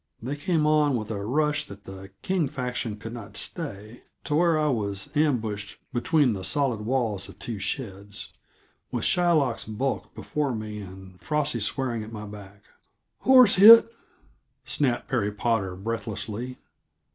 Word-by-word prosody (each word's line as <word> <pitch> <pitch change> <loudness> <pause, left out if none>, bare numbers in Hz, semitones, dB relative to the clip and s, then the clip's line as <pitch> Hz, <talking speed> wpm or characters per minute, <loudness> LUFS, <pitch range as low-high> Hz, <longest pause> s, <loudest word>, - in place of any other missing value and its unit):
They 130 +5 -4
came 155 +1 0
on 150 -2 +3
with 110 -2 -3
a 100 -2 -3
rush 150 +6 +1
that 100 0 -11
the 95 0 -10
King 185 -5 +1
faction 125 -5 -4
could 115 +2 -8
not 115 -4 -8
stay, 115 - -4 0.2
to - - -3
where 165 +1 +3
I 155 - +1
was 105 -2 -2
ambushed 110 -9 0 0.2
between 140 0 +2
the 95 -2 -5
solid 135 -2 +1
walls 110 -4 -1
of - - -13
two 115 -4 -6
sheds, 100 -2 -5 0.6
with - - -2
Shylock's 155 -9 +2
bulk 120 +5 -3
before 145 -4 -2
me 105 -1 -6
and 95 -2 -11
Frosty 150 +2 0
swearing 115 +1 -1
at 110 - -10
my 105 -1 -7
back. 100 -1 -11 0.6
"Horse 255 -7 +6
hit?" 230 +3 +9 0.7
snapped 130 -5 -1
Perry 120 -7 0
Potter 105 -3 -1
breathlessly. 110 +3 -4
115 Hz, 145 wpm, -26 LUFS, 105-145 Hz, 0.7 s, hit